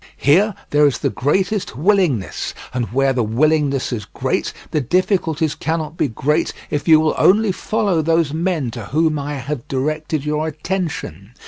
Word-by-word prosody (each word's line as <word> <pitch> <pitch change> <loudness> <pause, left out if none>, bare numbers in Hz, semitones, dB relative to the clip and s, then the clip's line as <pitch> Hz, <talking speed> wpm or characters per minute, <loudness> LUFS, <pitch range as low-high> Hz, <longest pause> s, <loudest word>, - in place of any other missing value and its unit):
Here 190 +8 +3 0.2
there 150 0 +5
is 140 - 0
the - - -1
greatest 185 - 0
willingness, 155 - +1 0.2
and 125 -2 -1
where 135 +2 +2
the 125 - 0
willingness 140 +4 +1
is 105 -4 -4
great - - -2 0.2
the 150 - +1
difficulties 160 - +1
cannot 160 -1 -3
be 150 - +1
great 150 +7 0 0.2
if 145 +1 -2
you 160 -1 +7
will 155 0 +2
only 210 +2 +4
follow 200 -3 0
those 165 -1 +1
men 160 -6 -1
to 115 -3 -7
whom 155 +5 +1
I 145 +1 -4
have 140 +1 -5
directed 155 +1 -2
your 150 +1 -1
attention. 155 - -4
155 Hz, 160 wpm, -19 LUFS, 135-165 Hz, 0.2 s, you